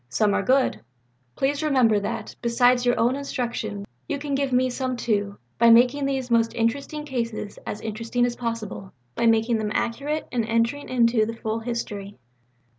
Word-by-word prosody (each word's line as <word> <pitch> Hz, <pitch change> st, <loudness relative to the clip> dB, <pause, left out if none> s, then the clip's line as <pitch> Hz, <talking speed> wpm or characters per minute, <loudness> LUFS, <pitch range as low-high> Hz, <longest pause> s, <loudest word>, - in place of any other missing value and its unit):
Some 205 Hz, -, +2 dB
are -, -, +2 dB
good. 260 Hz, +1 st, +2 dB, 0.5 s
Please 280 Hz, +2 st, 0 dB
remember 255 Hz, -8 st, +3 dB
that, 200 Hz, -, -5 dB
besides 245 Hz, +1 st, +3 dB
your 245 Hz, -, +2 dB
own 240 Hz, +3 st, +3 dB
instruction, 240 Hz, -7 st, -4 dB, 0.2 s
you -, -, -1 dB
can 285 Hz, 0 st, -4 dB
give 275 Hz, -1 st, 0 dB
me 255 Hz, +1 st, +3 dB
some 255 Hz, 0 st, -3 dB
too, 205 Hz, -4 st, -1 dB, 0.2 s
by 235 Hz, 0 st, +6 dB
making 250 Hz, +5 st, +5 dB
these 265 Hz, -3 st, -2 dB
most 230 Hz, -1 st, +2 dB
interesting 280 Hz, +6 st, -1 dB
cases 230 Hz, -6 st, -4 dB
as 210 Hz, -, -4 dB
interesting 230 Hz, +3 st, -1 dB
as 245 Hz, -1 st, -2 dB
possible 230 Hz, -5 st, -5 dB, 0.2 s
by 235 Hz, -, +1 dB
making 225 Hz, 0 st, +3 dB
them 215 Hz, -1 st, -2 dB
accurate 285 Hz, +6 st, -2 dB
and 240 Hz, -2 st, 0 dB
entering 230 Hz, +5 st, 0 dB
into 235 Hz, -3 st, +3 dB
the 230 Hz, -, -4 dB
full 220 Hz, 0 st, -2 dB
history." 210 Hz, -4 st, -5 dB
235 Hz, 170 wpm, -24 LUFS, 225-260 Hz, 0.5 s, by